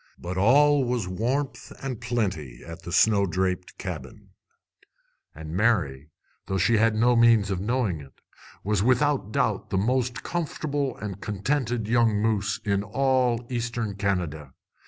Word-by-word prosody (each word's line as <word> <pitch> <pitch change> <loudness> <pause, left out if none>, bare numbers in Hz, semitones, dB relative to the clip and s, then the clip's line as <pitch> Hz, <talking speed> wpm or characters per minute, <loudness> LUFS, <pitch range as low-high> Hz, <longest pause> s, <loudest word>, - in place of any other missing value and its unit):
But 90 +1 -6
all 140 +8 +5
was 120 -5 -1
warmth 125 +9 -2
and 130 -4 -4
plenty 95 - -3
at 85 +1 -9
the 85 - -8
snow 100 +1 +4
draped 90 +1 -2
cabin; - - -7 1.1
and 80 +1 -8
Mary, 85 - +1 0.4
though 95 - -1
she 110 +5 +3
had 110 0 +3
no 120 +3 +3
means 115 -4 +4
of 95 - -1
knowing 105 - -1
it, 70 -2 -16 0.4
was 105 -1 +1
without 130 -1 +2
doubt - - 0
the - - 0
most 120 +3 0
comfortable 145 -5 -2
and 100 -2 -6
contented 115 +2 -1
young 115 -1 +3
moose 105 -1 0
in 100 -1 +1
all 125 0 +1
Eastern 120 -3 -2
Canada. 90 -8 -2
110 Hz, 140 wpm, -26 LUFS, 95-125 Hz, 1.1 s, all